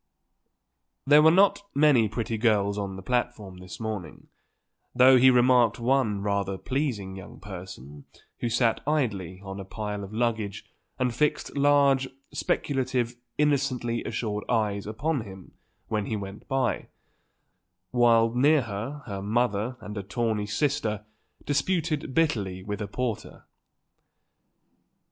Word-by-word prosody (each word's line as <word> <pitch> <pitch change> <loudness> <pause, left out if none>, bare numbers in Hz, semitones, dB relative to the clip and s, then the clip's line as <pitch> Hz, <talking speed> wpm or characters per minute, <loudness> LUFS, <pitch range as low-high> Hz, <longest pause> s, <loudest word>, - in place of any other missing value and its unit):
There 145 +2 +7
were 160 - +7
not 200 +4 +4
many 140 -7 +4
pretty 115 +1 -3
girls 105 -3 +2
on 100 -2 -4
the 95 - -9
platform 120 -4 -2
this 90 0 -10
morning, 105 -8 -6 0.7
though 130 +1 +7
he 130 +1 +7
remarked 125 -2 +4
one 120 -5 +1
rather 100 -1 -1
pleasing 115 -8 -2
young 95 - -11
person 90 -8 -10 0.3
who 120 - -1
sat 115 0 +1
idly 100 - -1
on 95 0 -7
a - - -5
pile 105 +1 -5
of 100 - -8
luggage 110 -3 -2 0.3
and 125 -2 0
fixed 150 +4 0
large, 140 -2 +3 0.2
speculative, 130 -3 -1 0.2
innocently 135 -5 0
assured 110 -2 -3
eyes 105 -4 0
upon 135 +6 -1
him 95 -3 -11 0.4
when 105 -2 -2
he 110 - -2
went 100 0 -7
by, 135 -1 -1 1.0
while 115 -2 +4
near 140 +3 +4
her 115 +7 -5
her 100 -3 -5
mother 115 +2 0
and 105 0 -6
a - - -3
tawny 105 +1 -2
sister 110 -3 -1 0.4
disputed 150 -1 -1
bitterly 105 - 0
with 105 +1 -5
a 105 - -3
porter. 115 +1 -4
115 Hz, 130 wpm, -27 LUFS, 100-130 Hz, 1.0 s, There